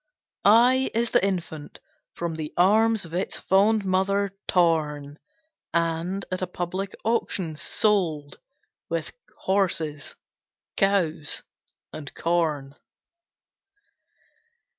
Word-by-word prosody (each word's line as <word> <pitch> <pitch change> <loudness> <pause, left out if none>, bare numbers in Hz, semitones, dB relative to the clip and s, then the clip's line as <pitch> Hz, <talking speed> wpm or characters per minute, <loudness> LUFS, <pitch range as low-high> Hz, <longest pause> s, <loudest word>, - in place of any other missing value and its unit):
I 245 +5 +5
I - - +1
is 235 0 -1
the - - +3
Infant, 170 -6 -3 0.4
from 170 -1 -3
the 155 -1 -5
arms 215 +3 +4
Of 165 - -12
its 185 +3 -2
fond 205 +2 +3
mother 195 +1 +1
torn, 150 -4 +1 0.6
And, 170 +3 -1
at 185 - -2
a 185 - -1
public 180 +2 -4
auction, 200 -7 -1
sold 160 -5 0 0.5
With - - -2 0.3
horses, 165 -7 -1 0.6
cows, 175 -7 +1 0.5
and 145 -2 -7
corn. 155 -5 0
180 Hz, 95 wpm, -25 LUFS, 160-200 Hz, 0.6 s, I